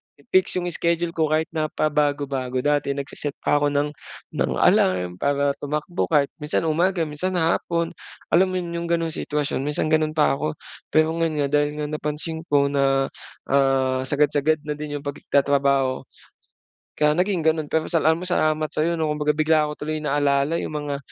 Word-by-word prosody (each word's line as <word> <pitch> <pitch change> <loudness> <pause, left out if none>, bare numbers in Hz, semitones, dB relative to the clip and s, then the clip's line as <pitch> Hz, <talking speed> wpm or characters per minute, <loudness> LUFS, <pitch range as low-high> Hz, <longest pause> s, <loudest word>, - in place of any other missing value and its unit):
i 145 - -23
fix 185 0 +3
'yong 175 -1 -1
schedule 170 0 0
ko 160 -2 +1
kahit 155 +1 0
na 155 -1 -1
pabago-bago. 140 -4 -1
Dati 145 -1 +1
nagse-set 140 +1 -4
pa 145 - +3
ako 145 - +2
ng 145 +1 0 0.5
ng - - +1
alarm 90 -1 +2
para 140 0 +1
tumakbo 150 +4 -2
kahit 145 -3 +2
minsan 150 +2 -1
umaga, 170 +3 +1
minsan 160 +5 -3
hapon 170 0 0 0.4
alam 185 +3 +5
mo 185 - -4
yun? 170 - -6
'Yong 170 0 -3
gano'ng 165 -1 -2
sitwasyon 150 -3 -2
minsan 150 +3 -1
gano'n 155 0 +2
pa 150 -3 +3
ako, 75 - -2 0.3
pero 155 0 +3
ngayon 165 -2 0
nga - - +1
dahil 145 0 -1
nga 150 0 -3
napansin 155 +2 -3
ko 140 -2 +2
na, 135 -1 +1 0.4
ah, 135 -1 +2
sagad-sagad 150 +2 +1
na 150 -1 -4
din 150 -1 -5
'yong 145 - -6
pagki 145 -1 -7
tatrabaho 140 -2 +2 0.9
kaya 150 0 +3
naging 180 0 0
ganun. 160 -1 +1
Pero 160 +1 0
salamat, 160 +1 +2
salamat 155 -3 +1
sa'yo, 170 +2 0
'no, 160 -1 0
kumbaga 150 0 0
bigla 155 -1 +3
ko 150 - -7
tuloy 155 +1 -3
naalala 145 +1 +1
yung - - -4
mga, 145 -1 -3
150 Hz, 175 wpm, -23 LUFS, 140-160 Hz, 0.9 s, alam